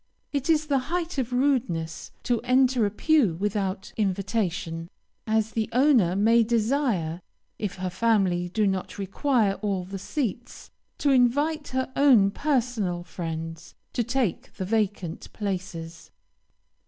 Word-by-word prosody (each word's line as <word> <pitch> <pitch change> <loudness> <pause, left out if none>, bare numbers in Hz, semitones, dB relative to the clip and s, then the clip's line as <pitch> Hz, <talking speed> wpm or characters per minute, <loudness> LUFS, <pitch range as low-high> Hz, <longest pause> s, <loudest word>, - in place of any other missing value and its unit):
It 280 +1 -1
is 310 -1 +3
the 280 -3 +2
height 345 -3 -2
of 250 -1 -2
rudeness 245 - 0
to 240 -2 0
enter 255 -2 +3
a - - -1
pew 230 - +2
without 195 0 -2
invitation, 185 -5 -1 0.4
as 220 0 +1
the 220 -1 -1
owner 245 - +4
may 225 +4 +4
desire, 225 - 0 0.4
if 210 -3 -3
her 185 -1 -3
family 185 -4 +1
do 210 +3 +1
not 190 -2 -2
require 205 +1 +1
all 200 -3 -1
the 195 +1 -6
seats, 240 - -4 0.3
to 285 - +2
invite 285 +5 +2
her 260 0 -2
own 245 -9 +5
personal 230 -10 -1
friends 165 -1 -6 0.2
to 240 - +1
take 240 -5 -1
the 190 - -4
vacant 200 -5 -2
places. 180 -5 -5
215 Hz, 130 wpm, -26 LUFS, 185-255 Hz, 0.4 s, own